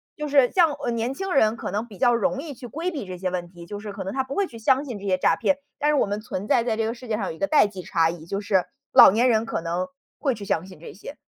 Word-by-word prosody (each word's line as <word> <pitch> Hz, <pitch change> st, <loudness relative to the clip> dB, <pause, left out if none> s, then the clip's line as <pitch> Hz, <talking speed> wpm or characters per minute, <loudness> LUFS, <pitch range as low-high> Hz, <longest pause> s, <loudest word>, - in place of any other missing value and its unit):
就 300 Hz, -1 st, -4 dB
是 275 Hz, -3 st, +4 dB
像， 335 Hz, -5 st, +4 dB
呃， 240 Hz, -, -3 dB
年 235 Hz, +2 st, -1 dB
轻 385 Hz, +7 st, -4 dB
人 220 Hz, -4 st, +3 dB
可 -, -, -5 dB
能 215 Hz, +4 st, -2 dB
比 205 Hz, -, -13 dB
较 245 Hz, +1 st, +4 dB
容 265 Hz, +3 st, 0 dB
易 295 Hz, -1 st, -6 dB
去 250 Hz, -1 st, -10 dB
规 330 Hz, +9 st, -3 dB
避 290 Hz, -9 st, -5 dB
这 180 Hz, -1 st, -6 dB
些 185 Hz, 0 st, -2 dB
问 175 Hz, -1 st, -3 dB
题， 170 Hz, -1 st, -13 dB
就 205 Hz, +3 st, -7 dB
是 210 Hz, -1 st, -7 dB
可 200 Hz, -1 st, -6 dB
能 190 Hz, -, -5 dB
他 265 Hz, 0 st, 0 dB
不 265 Hz, +1 st, -7 dB
会 400 Hz, -, +2 dB
去 230 Hz, -9 st, -11 dB
相 265 Hz, +5 st, +2 dB
信 235 Hz, -7 st, -6 dB
这 200 Hz, -, -9 dB
些 185 Hz, -1 st, +2 dB
诈 -, -, +3 dB
骗， 285 Hz, -, +1 dB, 0.2 s
但 295 Hz, -, +2 dB
是 300 Hz, -, +3 dB
我 -, -, +3 dB
们 205 Hz, +1 st, -3 dB
存 205 Hz, -2 st, -5 dB
在 230 Hz, -, +3 dB
在 225 Hz, -2 st, -1 dB
这 225 Hz, -, 0 dB
个 225 Hz, -, -1 dB
世 250 Hz, 0 st, -12 dB
界 215 Hz, -1 st, -1 dB
上 200 Hz, -, -2 dB
有 -, -, -3 dB
一 160 Hz, -, -10 dB
个 295 Hz, -, +1 dB
代 300 Hz, -6 st, +5 dB
际 195 Hz, -2 st, -6 dB
差 165 Hz, -2 st, +1 dB
异， 170 Hz, -2 st, -10 dB
就 200 Hz, +2 st, -2 dB
是 195 Hz, -3 st, +1 dB, 0.3 s
老 -, -, +10 dB
年 235 Hz, +6 st, +3 dB
人 220 Hz, -2 st, +3 dB
可 225 Hz, -, -3 dB
能 175 Hz, +2 st, -2 dB, 0.3 s
会 270 Hz, -5 st, 0 dB
去 205 Hz, -1 st, -8 dB
相 185 Hz, -2 st, -1 dB
信 185 Hz, -5 st, -13 dB
这 -, -, -10 dB
些。 210 Hz, -, -10 dB
225 Hz, 350 characters per minute, -24 LUFS, 190-270 Hz, 0.3 s, 老